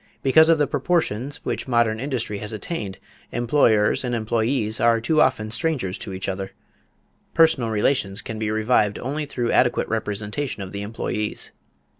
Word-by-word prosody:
Because 160 Hz, +4 st, +6 dB
of 165 Hz, -, +5 dB
the 150 Hz, -, +3 dB
proportions 140 Hz, -4 st, -1 dB
which -, -, -3 dB
modern 115 Hz, -3 st, +2 dB
industry 120 Hz, -6 st, -2 dB
has 105 Hz, +1 st, -4 dB
attained, 105 Hz, -, -4 dB, 0.3 s
employers 120 Hz, -4 st, +2 dB
and 125 Hz, -1 st, -1 dB
employees 110 Hz, 0 st, 0 dB
are 115 Hz, 0 st, +4 dB
too 155 Hz, +7 st, +2 dB
often 110 Hz, -4 st, +1 dB
strangers 115 Hz, -, -1 dB
to -, -, -6 dB
each 95 Hz, 0 st, -4 dB
other.... 95 Hz, 0 st, -4 dB, 0.8 s
Personal 160 Hz, -8 st, +4 dB
relations 105 Hz, -2 st, 0 dB
can 110 Hz, -1 st, -6 dB
be 110 Hz, -1 st, -1 dB
revived 110 Hz, -1 st, +2 dB
only 145 Hz, +4 st, -3 dB
through 120 Hz, -4 st, -2 dB
adequate 125 Hz, -1 st, +2 dB
representation 105 Hz, +2 st, -3 dB
of 95 Hz, -, -8 dB
the 100 Hz, -, -5 dB
employees. 105 Hz, 0 st, -3 dB
115 Hz, 155 wpm, -23 LUFS, 105-135 Hz, 0.8 s, Because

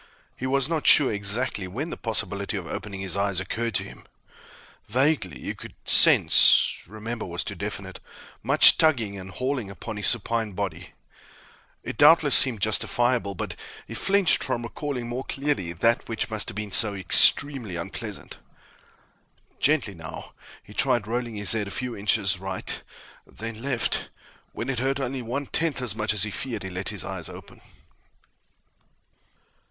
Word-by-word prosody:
He 130 Hz, -, -5 dB
was 135 Hz, 0 st, +1 dB
not 160 Hz, -2 st, -2 dB
sure 140 Hz, -6 st, +6 dB
exactly 100 Hz, 0 st, -1 dB
when 135 Hz, -, -5 dB
the -, -, -4 dB
possibility 100 Hz, -2 st, -2 dB
of 90 Hz, -, -6 dB
opening 100 Hz, +2 st, -7 dB
his 95 Hz, -1 st, -2 dB
eyes 100 Hz, -2 st, 0 dB
occurred 115 Hz, +3 st, -4 dB
to -, -, 0 dB
him. -, -, -13 dB, 0.8 s
Vaguely, 140 Hz, +4 st, 0 dB
he -, -, -5 dB
could -, -, -12 dB
sense -, -, +7 dB
"remember" 110 Hz, +3 st, -6 dB
was 85 Hz, -1 st, -4 dB
too 100 Hz, -, -6 dB
definite 100 Hz, 0 st, -6 dB, 0.4 s
much -, -, +6 dB
tugging 120 Hz, -11 st, +1 dB
and 95 Hz, -1 st, -9 dB
hauling 125 Hz, +1 st, -4 dB
upon 105 Hz, +3 st, -8 dB
his 105 Hz, -, -2 dB
supine 115 Hz, -2 st, -1 dB
body. 90 Hz, -3 st, -6 dB, 0.9 s
It -, -, -7 dB
doubtless -, -, +6 dB
seemed 120 Hz, -6 st, +6 dB
justifiable, 120 Hz, -1 st, 0 dB
but -, -, -5 dB, 0.3 s
he -, -, -9 dB
flinched 195 Hz, -3 st, +2 dB
from 120 Hz, -, -3 dB
recalling 125 Hz, 0 st, -5 dB
more 125 Hz, +2 st, -5 dB
clearly 135 Hz, -, -2 dB
that 115 Hz, +9 st, 0 dB
which 115 Hz, 0 st, -3 dB
must 110 Hz, -2 st, -3 dB
have -, -, -9 dB
been 105 Hz, -1 st, -5 dB
so 105 Hz, +1 st, +2 dB
extremely 115 Hz, +3 st, +3 dB
unpleasant. 85 Hz, -, -7 dB, 1.2 s
Gently, 140 Hz, -9 st, +1 dB
now, 80 Hz, -2 st, -10 dB, 0.3 s
he -, -, -15 dB
tried 120 Hz, -4 st, +1 dB
rolling 120 Hz, 0 st, -4 dB
his 105 Hz, -1 st, +3 dB
head 110 Hz, -2 st, 0 dB
a -, -, -6 dB
few 125 Hz, +3 st, -4 dB
inches 100 Hz, -2 st, +1 dB
right, 95 Hz, 0 st, -4 dB, 0.5 s
then 115 Hz, 0 st, -8 dB
left. 125 Hz, -4 st, 0 dB, 0.4 s
When -, -, -6 dB
it 130 Hz, -3 st, -2 dB
hurt 135 Hz, +2 st, -1 dB
only 135 Hz, -1 st, -4 dB
one 125 Hz, +5 st, -4 dB
tenth 160 Hz, +1 st, -1 dB
as 125 Hz, -6 st, -1 dB
much 110 Hz, -1 st, -2 dB
as 105 Hz, -2 st, +2 dB
he 105 Hz, -, -2 dB
feared, 115 Hz, -2 st, -5 dB
he 95 Hz, -, -7 dB
let 95 Hz, +1 st, -3 dB
his -, -, -5 dB
eyes -, -, -5 dB
open. -, -, -13 dB
110 Hz, 160 wpm, -24 LUFS, 100-125 Hz, 1.2 s, sense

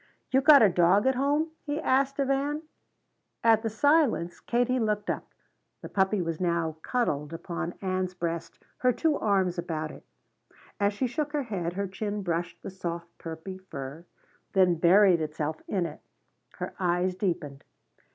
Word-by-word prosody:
"You 265 Hz, +1 st, +4 dB
got 285 Hz, -3 st, +8 dB
a -, -, +8 dB
dog 180 Hz, +4 st, +4 dB
at 265 Hz, -, +4 dB
home?" 290 Hz, +5 st, +1 dB
he 290 Hz, 0 st, -2 dB
asked 275 Hz, 0 st, +1 dB
of 275 Hz, -1 st, +1 dB
Ann. 290 Hz, +3 st, 0 dB, 0.8 s
At 225 Hz, -1 st, +5 dB
the 225 Hz, -, -1 dB
silence, 255 Hz, -, +2 dB
Katie 245 Hz, +1 st, +1 dB
looked 210 Hz, -2 st, 0 dB
up. -, -, -5 dB, 0.6 s
The -, -, -6 dB
puppy 190 Hz, -1 st, +1 dB
was 165 Hz, 0 st, -3 dB
now 170 Hz, -3 st, 0 dB
cuddled 155 Hz, -, -1 dB
upon 170 Hz, +1 st, -4 dB
Ann's 185 Hz, -1 st, -1 dB
breast, 170 Hz, -1 st, -4 dB, 0.2 s
her 250 Hz, -, +3 dB
two 305 Hz, +5 st, +1 dB
arms 190 Hz, -4 st, +1 dB
about 155 Hz, -2 st, -3 dB
it. -, -, -13 dB, 0.8 s
As 200 Hz, 0 st, +2 dB
she 230 Hz, +6 st, -1 dB
shook 295 Hz, +4 st, -2 dB
her 295 Hz, -2 st, 0 dB
head 180 Hz, -8 st, -3 dB
her 200 Hz, +2 st, -2 dB
chin 205 Hz, +2 st, -4 dB
brushed 175 Hz, -1 st, -3 dB
the -, -, -6 dB
soft 170 Hz, -2 st, -6 dB
puppy 165 Hz, +3 st, -7 dB
fur 145 Hz, -3 st, -8 dB, 0.5 s
then 185 Hz, -2 st, +5 dB
buried 175 Hz, +1 st, +5 dB
itself 155 Hz, 0 st, -3 dB
in 185 Hz, -3 st, 0 dB
it. -, -, -7 dB, 0.5 s
Her -, -, -6 dB
eyes 180 Hz, 0 st, +1 dB
deepened. 165 Hz, -7 st, -3 dB
190 Hz, 160 wpm, -28 LUFS, 170-245 Hz, 0.8 s, got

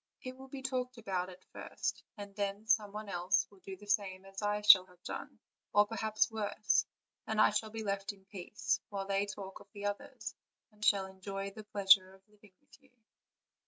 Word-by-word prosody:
It 255 Hz, 0 st, -6 dB
will 265 Hz, +1 st, -11 dB
be 265 Hz, 0 st, -8 dB
talked 255 Hz, -1 st, -2 dB
about 190 Hz, -5 st, -2 dB
at 185 Hz, 0 st, -13 dB
first, -, -, -3 dB, 0.2 s
and 200 Hz, -1 st, -8 dB
then 200 Hz, +1 st, -2 dB
some 215 Hz, -2 st, +3 dB
one 210 Hz, +1 st, -6 dB
else 185 Hz, 0 st, +2 dB
will 200 Hz, -, -18 dB
do 190 Hz, 0 st, -8 dB
the 205 Hz, -, -13 dB
same 195 Hz, -2 st, 0 dB
as 195 Hz, +1 st, -8 dB
I 210 Hz, 0 st, 0 dB
shall 190 Hz, -3 st, +9 dB
have 180 Hz, 0 st, -22 dB
done, -, -, -6 dB, 0.4 s
or 205 Hz, 0 st, +7 dB
perhaps 220 Hz, 0 st, +1 dB
worse; 215 Hz, -1 st, +1 dB, 0.4 s
and 220 Hz, -1 st, 0 dB
I 215 Hz, -, +7 dB
shall 215 Hz, +1 st, 0 dB
be 220 Hz, 0 st, -5 dB
left 200 Hz, -1 st, -1 dB
in 195 Hz, -1 st, -19 dB
peace, 195 Hz, +1 st, -2 dB
while 195 Hz, -1 st, -3 dB
they 195 Hz, +1 st, +1 dB
talk 195 Hz, -1 st, -7 dB
of -, -, -15 dB
the 205 Hz, -1 st, -6 dB
others, 205 Hz, 0 st, -4 dB, 0.4 s
and 210 Hz, 0 st, -13 dB
shall 200 Hz, -3 st, +4 dB
enjoy 195 Hz, +1 st, -5 dB
the 215 Hz, +1 st, -10 dB
pleasure 190 Hz, -2 st, +5 dB
of 190 Hz, +1 st, -25 dB
living 210 Hz, -2 st, -21 dB
with 290 Hz, -, -21 dB
you." 265 Hz, -, -24 dB
205 Hz, 200 wpm, -34 LUFS, 195-215 Hz, 0.4 s, shall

